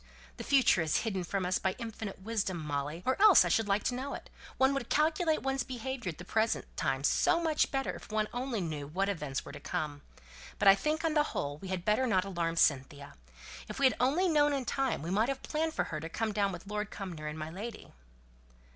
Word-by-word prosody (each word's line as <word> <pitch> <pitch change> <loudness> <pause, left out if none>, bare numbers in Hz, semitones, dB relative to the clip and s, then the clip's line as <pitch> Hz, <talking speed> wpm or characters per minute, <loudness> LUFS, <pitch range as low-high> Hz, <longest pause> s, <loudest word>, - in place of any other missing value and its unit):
The - - -6
future 265 -10 +4
is 160 -2 +1
hidden 195 -5 -2
from 190 +1 -2
us 185 +1 +1
by 190 0 -1
infinite 220 -5 -6
wisdom, 205 -4 -1
Molly, 150 +1 -3
or 260 +9 +1
else 420 -4 +8
I - - 0
should 225 -2 +2
like 200 +1 +1
to 250 - 0
know 265 +3 -4
it; - - -11 0.3
one 265 +1 +4
would 275 -4 -3
calculate 315 +1 +2
one's 270 0 0
behaviour 250 -3 -4
at 160 - -6
the 180 - -9
present 220 +4 0
time - - -1
so 340 - +3
much 320 -3 +1
better 270 -1 -1
if - - -11
one 215 0 +1
only 245 -3 -2
knew 155 -4 -4
what 195 +6 -1
events 150 -8 -3
were - - -8
to - - -9
come. 155 -5 -4 0.6
But 205 - +2
I 195 - +11
think, 305 +10 -1
on 320 - +1
the 300 - +4 0.2
whole, 145 +1 -3
we 190 - -8
had 185 -2 -3
better 215 +5 +2
not 190 -5 +2
alarm 170 -4 -2
Cynthia. 140 -2 +1 0.6
If - - -6
we 275 - +3
had 260 - +5
only 295 +9 +3
known 295 -3 +3
in 270 -3 -2
time 265 - -1
we 170 - -3
might 215 +6 +2
have 270 -1 -3
planned 320 +1 -1
for - - +1
her 155 - -2
to 160 - -7
have - - -14
come 225 -1 -1
down 200 -1 +1
with 175 0 -8
Lord 210 +1 -3
Cumnor 175 -6 -6
and 150 +1 -5
my 155 0 -5
lady." 210 +5 -8
210 Hz, 235 wpm, -31 LUFS, 175-265 Hz, 0.6 s, I